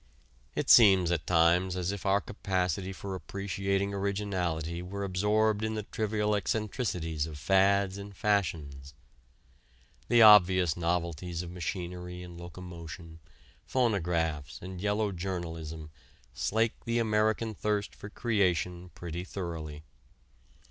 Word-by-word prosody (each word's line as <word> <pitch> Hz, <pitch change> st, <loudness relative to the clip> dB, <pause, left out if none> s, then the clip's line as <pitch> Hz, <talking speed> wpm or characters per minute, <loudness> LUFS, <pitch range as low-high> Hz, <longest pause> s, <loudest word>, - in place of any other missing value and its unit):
It -, -, -1 dB
seems 95 Hz, -6 st, +7 dB
at 85 Hz, -3 st, -1 dB
times 90 Hz, +2 st, +3 dB
as 90 Hz, +1 st, -1 dB
if 100 Hz, -1 st, -5 dB
our 100 Hz, +1 st, +4 dB
capacity 95 Hz, -2 st, -2 dB
for 95 Hz, 0 st, -6 dB
appreciating 100 Hz, +1 st, -2 dB
originality 95 Hz, -5 st, -2 dB
were 100 Hz, +3 st, -5 dB
absorbed 105 Hz, +3 st, +1 dB
in 110 Hz, 0 st, -1 dB
the 105 Hz, -, -3 dB
trivial 105 Hz, 0 st, -1 dB
eccentricities 100 Hz, -, -1 dB
of 75 Hz, -2 st, -8 dB
fads 95 Hz, +4 st, +2 dB
and 100 Hz, -1 st, -10 dB
fashions. 75 Hz, -9 st, -1 dB, 1.1 s
The 120 Hz, -1 st, +6 dB
obvious 95 Hz, -5 st, +7 dB
novelties 85 Hz, 0 st, -2 dB
of 85 Hz, -, -8 dB
machinery 90 Hz, 0 st, -5 dB
and 90 Hz, -1 st, -10 dB
locomotion, 85 Hz, -1 st, -9 dB, 0.5 s
phonographs 85 Hz, -, 0 dB
and 90 Hz, 0 st, -8 dB
yellow 105 Hz, 0 st, 0 dB
journalism 80 Hz, -4 st, -5 dB, 0.4 s
slake 110 Hz, +1 st, 0 dB
the 115 Hz, 0 st, 0 dB
American 110 Hz, 0 st, +1 dB
thirst 105 Hz, 0 st, -1 dB
for 100 Hz, -, -10 dB
creation 90 Hz, -6 st, 0 dB
pretty 85 Hz, 0 st, -5 dB
thoroughly. 80 Hz, -5 st, -6 dB
95 Hz, 115 wpm, -30 LUFS, 85-100 Hz, 1.1 s, seems